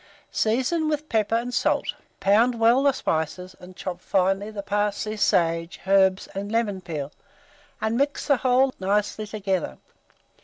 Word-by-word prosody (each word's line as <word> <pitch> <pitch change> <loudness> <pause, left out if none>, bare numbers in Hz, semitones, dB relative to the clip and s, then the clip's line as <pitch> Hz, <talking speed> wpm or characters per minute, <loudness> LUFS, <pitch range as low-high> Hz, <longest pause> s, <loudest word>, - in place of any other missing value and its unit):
Season 260 +9 +1
with 300 0 -2
pepper 220 0 +1
and 245 +2 -2
salt; - - +1 0.3
pound 230 +4 +3
well 230 +3 +5
the 280 0 +4
spices, 180 - -3
and 180 0 -13
chop 180 -1 -6
finely 195 +3 +1
the 205 -2 -6
parsley, 205 +1 -1
sage, 165 -4 +1
herbs, 190 -1 +3
and 200 +2 -5
lemon 215 -4 0
peel, 150 -5 -5 0.7
and 220 +1 -1
mix 285 +2 0
the 280 -3 +3
whole 260 +1 +3
nicely 210 +2 -1
together. 195 - -2
205 Hz, 145 wpm, -24 LUFS, 185-235 Hz, 0.7 s, well